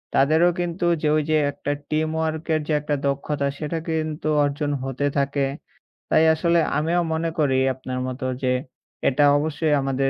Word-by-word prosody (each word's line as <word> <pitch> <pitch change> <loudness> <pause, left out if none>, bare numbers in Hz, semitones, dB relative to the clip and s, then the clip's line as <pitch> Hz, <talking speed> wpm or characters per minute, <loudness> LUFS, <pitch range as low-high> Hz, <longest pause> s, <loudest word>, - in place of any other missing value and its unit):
তাদেরও 160 +5 +4
কিন্তু 175 0 -2 0.2
যে, 155 - +1
ওই 155 - +1
যে 155 - +4
একটা 145 - -4 0.2
টিম 155 +1 0
ওয়ার্কের 160 0 -1
যে 155 - 0
একটা 150 0 -1
দক্ষতা 140 +1 -1
সেটা 155 +2 -3
কিন্তু 155 -1 -2 0.2
অর্জন 145 +1 -1
হতে 135 +1 -2
থাকে। 140 0 +1 0.6
তাই 160 - +4
আসলে 170 +1 +2 0.2
আমিও 165 +3 +1
মনে 165 +1 -1
করি 135 -3 +2 0.2
আপনার 130 0 -5
মতো 130 0 -5 0.2
যে 125 0 +2 0.6
এটা 145 +2 +3
অবশ্যই 155 0 0
আমাদের 135 0 0
150 Hz, 160 wpm, -23 LUFS, 140-160 Hz, 0.6 s, তাদেরও